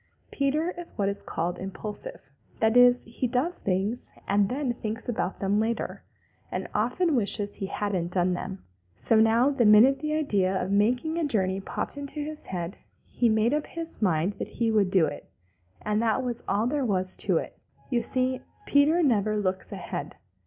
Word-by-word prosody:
Peter 300 Hz, +5 st, 0 dB
is 345 Hz, -, -7 dB
what 200 Hz, -2 st, +1 dB
is 200 Hz, 0 st, -2 dB
called 170 Hz, +2 st, -3 dB
impulsive. 210 Hz, -, -6 dB, 0.3 s
That 220 Hz, +1 st, +3 dB
is, 245 Hz, 0 st, +6 dB
he 235 Hz, +3 st, -3 dB
does 265 Hz, +9 st, -1 dB
things 200 Hz, +5 st, -2 dB, 0.2 s
and 200 Hz, 0 st, +3 dB
then 260 Hz, -1 st, -1 dB
thinks 225 Hz, +1 st, -5 dB
about 215 Hz, -6 st, -2 dB
them 200 Hz, +1 st, +1 dB
later, 230 Hz, +1 st, -2 dB, 0.5 s
and -, -, -3 dB
often 255 Hz, -, +1 dB
wishes 205 Hz, -2 st, +1 dB
he 195 Hz, -, -3 dB
hadn't 185 Hz, -4 st, -2 dB
done 180 Hz, 0 st, +2 dB
them. 190 Hz, +2 st, -5 dB, 0.3 s
So 225 Hz, -, +2 dB
now 230 Hz, +5 st, +4 dB
the 270 Hz, -4 st, +1 dB
minute 225 Hz, +6 st, +7 dB
the 305 Hz, 0 st, -1 dB
idea 195 Hz, -11 st, +1 dB
of 185 Hz, -, -2 dB
making 250 Hz, +11 st, +1 dB
a -, -, 0 dB
journey 190 Hz, -6 st, 0 dB
popped 195 Hz, -, -4 dB
into 285 Hz, +1 st, -5 dB
his 305 Hz, +1 st, -5 dB
head, 175 Hz, 0 st, -4 dB, 0.3 s
he 240 Hz, -, 0 dB
made 220 Hz, +3 st, +2 dB
up 300 Hz, 0 st, -1 dB
his 330 Hz, -4 st, -7 dB
mind 180 Hz, -1 st, +2 dB
that -, -, -3 dB
he 230 Hz, -1 st, +2 dB
would 205 Hz, -4 st, +3 dB
do 185 Hz, -4 st, +4 dB
it, 145 Hz, -, -7 dB, 0.5 s
and 210 Hz, +1 st, 0 dB
that 230 Hz, +2 st, +1 dB
was 240 Hz, -2 st, -3 dB
all 205 Hz, +3 st, +1 dB
there 280 Hz, +3 st, 0 dB
was 185 Hz, -5 st, 0 dB
to -, -, +2 dB
it. -, -, -5 dB, 0.3 s
You 240 Hz, -2 st, +2 dB
see, 255 Hz, +2 st, 0 dB, 0.2 s
Peter 305 Hz, +5 st, +4 dB
never 215 Hz, -6 st, +2 dB
looks 190 Hz, -2 st, -2 dB
ahead. -, -, -5 dB
225 Hz, 180 wpm, -27 LUFS, 195-265 Hz, 0.5 s, minute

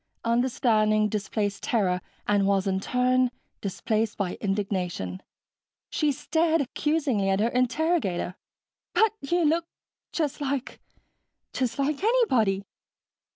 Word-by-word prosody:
Understanding 230 Hz, -3 st, +2 dB
displaced 205 Hz, -1 st, -2 dB
terror 185 Hz, -6 st, +1 dB, 0.3 s
and 205 Hz, -1 st, +3 dB
was, 195 Hz, -1 st, +2 dB
in 190 Hz, -1 st, +1 dB
turn, 255 Hz, +3 st, +2 dB, 0.3 s
displaced 215 Hz, +2 st, -1 dB
by 195 Hz, -3 st, -1 dB
indignation. 185 Hz, -, -2 dB, 0.7 s
She 300 Hz, -2 st, +2 dB
stared 320 Hz, +3 st, +1 dB
accusingly 280 Hz, -6 st, 0 dB
at 195 Hz, 0 st, +2 dB
her 225 Hz, +3 st, +2 dB
interrogator. 255 Hz, -, 0 dB, 0.6 s
"But 440 Hz, -1 st, +4 dB
you 340 Hz, +4 st, +1 dB
look 330 Hz, +2 st, +2 dB, 0.4 s
just 300 Hz, -2 st, -2 dB
like... 275 Hz, -2 st, -2 dB, 0.7 s
just 245 Hz, -3 st, -1 dB
like 280 Hz, +4 st, -1 dB
anybody." 255 Hz, -, +3 dB
235 Hz, 110 wpm, -26 LUFS, 200-295 Hz, 0.7 s, But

